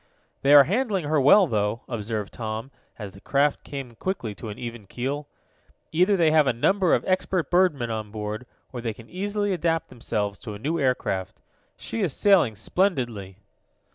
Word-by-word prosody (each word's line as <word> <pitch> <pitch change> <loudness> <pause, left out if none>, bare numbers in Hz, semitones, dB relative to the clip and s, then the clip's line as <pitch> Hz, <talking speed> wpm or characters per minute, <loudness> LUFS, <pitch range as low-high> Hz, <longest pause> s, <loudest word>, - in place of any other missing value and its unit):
"They 140 +1 +6
are 145 - +10
handling 200 - 0
her 150 -1 +2
well, 185 +9 +7
though," 110 -3 -1
observed 110 -3 -4
Tom, 110 +3 -5 0.3
as 105 -3 -7
the 100 +1 -15
craft 145 +1 +1
came 135 -4 -7
quickly 120 - -3
to 110 +2 -8
an 105 - -7
even 120 -4 -7
keel. 140 +7 -4 0.6
"Either 185 +5 +3
they 165 -3 +4
have 155 -2 +4
a 130 - +3
number 185 - +3
of - - -2
expert 185 -3 0
birdmen 155 -10 +2
on 110 -2 -4
board, 105 +3 -5 0.3
or 120 - -5
they 115 -2 -3
can 115 0 -15
easily 205 +2 -1
adapt 165 -2 -1
themselves 105 -4 -3
to 110 -3 -7
a - - -7
new 155 +10 -2
aircraft. 125 -8 -1 0.4
She 230 - -4
is 175 -9 0
sailing 180 - +4
splendidly." 115 - -1
130 Hz, 175 wpm, -25 LUFS, 110-175 Hz, 0.6 s, are